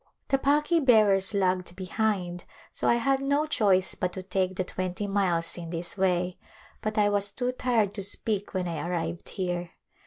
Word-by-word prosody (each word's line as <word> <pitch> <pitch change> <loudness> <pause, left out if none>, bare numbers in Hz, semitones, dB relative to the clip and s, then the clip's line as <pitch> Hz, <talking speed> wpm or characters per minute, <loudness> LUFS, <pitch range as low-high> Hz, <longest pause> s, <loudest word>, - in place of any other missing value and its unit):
The 270 - +3
palki 295 +5 +3
bearers 210 -5 +4
lagged 185 -2 0
behind, 185 -2 -2 0.3
so - - -3
I - - +5
had 270 +3 +1
no 285 +2 +1
choice 195 -10 +2
but 180 -1 -2
to 185 - -6
take 185 0 -1
the 185 - -1
twenty 185 +2 -4
miles 180 -4 0
in 170 -1 -7
this 170 +2 -3
way, 180 -2 0 0.4
but 215 0 -3
I 210 -1 +4
was 205 0 0
too 250 -1 -1
tired 235 -5 0
to 200 - -4
speak 205 +1 +1
when 185 -1 -1
I 165 -3 -3
arrived 170 -1 -3
here. 175 -2 -3
195 Hz, 180 wpm, -27 LUFS, 180-220 Hz, 0.4 s, I